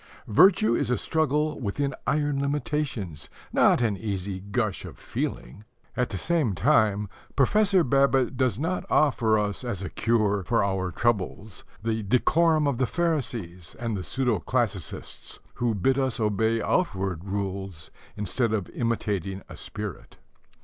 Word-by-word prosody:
Virtue 115 - +5
is - - 0
a 125 - +2
struggle 155 -1 0
within 135 +5 -2
iron 145 0 +1
limitations, 135 - -2 0.2
not - - +4
an 110 -3 +1
easy 95 -1 -4
gush 100 +1 -2
of - - -9
feeling. 65 +12 -5 0.3
At 125 -1 0
the 95 - -4
same 150 - 0
time, 105 - +3 0.3
Professor 195 - +4
Babbitt 135 -1 +2
does 130 -5 +1
not 165 +6 -1
offer 115 -7 +3
us 105 +2 -2
as 105 -6 -4
a 90 - -5
cure 105 -4 +1
for 115 -3 +2
our 95 -2 -1
troubles 105 0 -1 0.2
the 110 0 0
decorum 155 - +3
of 140 -4 0
the 130 - +2
Pharisees 115 - -2
and 115 -1 -2
the 95 - -4
pseudo 125 -4 0
classicists, 105 -2 -3
who 120 -2 0
bid 130 +7 +2
us 130 -3 0
obey 110 +1 +1
outward 95 - 0
rules 95 -4 -4 0.3
instead 110 +3 0
of 100 -5 -2
imitating 100 -5 -2
a - - -9
spirit. 105 -3 -7
115 Hz, 140 wpm, -26 LUFS, 100-135 Hz, 0.3 s, Virtue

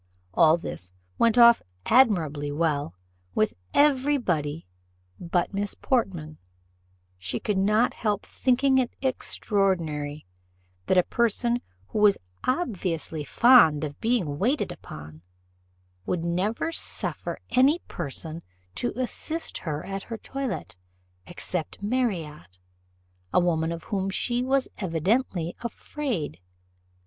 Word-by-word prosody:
All 160 - +6
this 90 - -6 0.3
went 230 0 +4
off 235 -1 +8 0.2
admirably 165 - +3
well 145 - -1 0.4
with 110 - +2 0.2
every 285 0 +4
body 160 - -2 0.5
but 175 +2 -1
Miss 200 0 -2
Portman; 175 - -1 0.8
she 95 0 -3
could 205 -3 0
not 210 +5 +3
help 210 -2 -1
thinking 265 +1 +2
it 250 - -1
extraordinary 170 - -1 0.6
that 190 - +3
a 180 - +6
person 235 +2 +1 0.3
who - - -2
was 210 -1 +5 0.3
obviously 185 - -2
fond 160 - +6
of 145 -2 -5
being 195 -12 0
waited 260 +8 +1
upon 75 +1 -10 0.9
would 170 -2 -1
never 195 - 0
suffer - - -1
any 265 +6 +5
person 160 +1 -5 0.3
to 240 - -2
assist 315 +6 -2
her 155 -3 -4
at 195 0 -4
her 225 +3 -6
toilet 270 - -5 0.5
except 175 +1 -5
Marriott, 170 - -2 0.7
a - - +4
woman 165 -2 +1
of 165 0 -5
whom 195 -1 -2
she 240 +5 -1
was 265 +1 +1
evidently 180 - 0
afraid. 235 - -4
195 Hz, 115 wpm, -26 LUFS, 160-245 Hz, 0.9 s, off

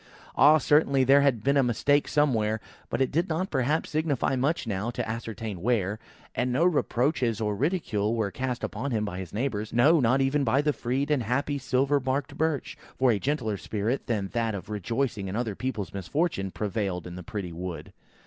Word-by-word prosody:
Ah, 150 +3 +7
certainly 140 -2 +3
there 135 +2 +6
had 130 -6 +2
been 140 +1 +3
a - - +6
mistake 135 +4 +2
somewhere, 110 -8 +1 0.3
but - - -1
it 130 - +2
did 170 +5 0
not 165 +4 -1
perhaps 145 +3 0
signify 150 -4 0
much 140 +6 0
now, 105 0 -2
to 120 - -3
ascertain 110 -4 -5
where; 105 -2 0 0.3
and 125 0 0
no 140 +8 +2
reproaches 130 - +1
or 105 -2 -1
ridicule 115 - 0
were 110 -4 -1
cast 125 +3 -3
upon 125 +7 -3
him 110 -4 0
by 95 -3 -5
his 95 -3 -7
neighbours; 110 -2 -2
no, 150 +8 +5
not 130 +1 +3
even 135 +2 +2
by 130 +2 +2
the 150 0 +2
freed 135 +4 -2
and 145 -4 +2
happy 140 +5 -1
silver 135 +2 +1
barked 135 +2 -2
Birch; 160 -3 -1 0.2
for 130 -1 +4
a 105 - +1
gentler 120 -7 -1
spirit 110 +7 -2
than 105 -5 -1
that 115 -2 -1
of 95 - -7
rejoicing 105 0 -2
in 95 - -4
other 115 -2 -1
people's 105 -4 -4
misfortunes, 95 - -1
prevailed 100 -3 -2
in 90 - -7
the 90 - -7
pretty 90 0 -5
wood. 90 0 -6
125 Hz, 195 wpm, -27 LUFS, 105-140 Hz, 0.3 s, Ah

